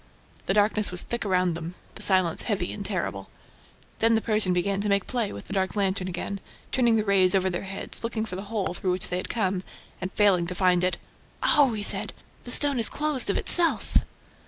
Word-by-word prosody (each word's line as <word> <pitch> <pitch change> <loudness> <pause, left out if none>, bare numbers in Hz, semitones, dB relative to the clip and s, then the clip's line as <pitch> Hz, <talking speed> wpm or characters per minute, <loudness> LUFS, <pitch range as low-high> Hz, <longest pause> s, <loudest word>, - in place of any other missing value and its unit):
The 190 - +1
darkness 210 0 +3
was 180 -1 -1
thick 235 - -3
around 185 -2 +2
them, 170 +2 -6 0.2
the - - -10
silence 185 -4 +2
heavy 195 -6 -1
and 205 - -6
terrible. 170 - -3 0.7
Then 225 0 +4
the 220 - +1
Persian 215 -4 0
began 195 +3 0
to 210 - 0
make 200 -1 +2
play 235 -4 -1
with 100 - -8
the - - -7
dark 190 0 -1
lantern 195 -2 0
again, 185 +2 -4 0.3
turning 240 -3 +3
the 215 -1 +1
rays 195 -2 +3
over 190 0 +2
their 175 +2 -4
heads, 195 - -5
looking 230 -1 -2
for 185 - -7
the 195 +2 -6
hole 210 -5 -2
through 180 0 -1
which 180 - -1
they 180 - -1
had 185 - -3
come, 190 -5 0 0.4
and 185 +1 -3
failing 190 -5 +3
to 180 - -4
find 180 -1 +3
it: 185 - +1 0.5
"Oh!" 280 -5 +4
he 210 -1 -3
said. - - 0 0.3
"The 245 - -5
stone 285 0 +3
has 230 - +4
closed 300 -4 0
of - - +1
itself!" 345 -2 +3
195 Hz, 215 wpm, -26 LUFS, 185-220 Hz, 0.7 s, Then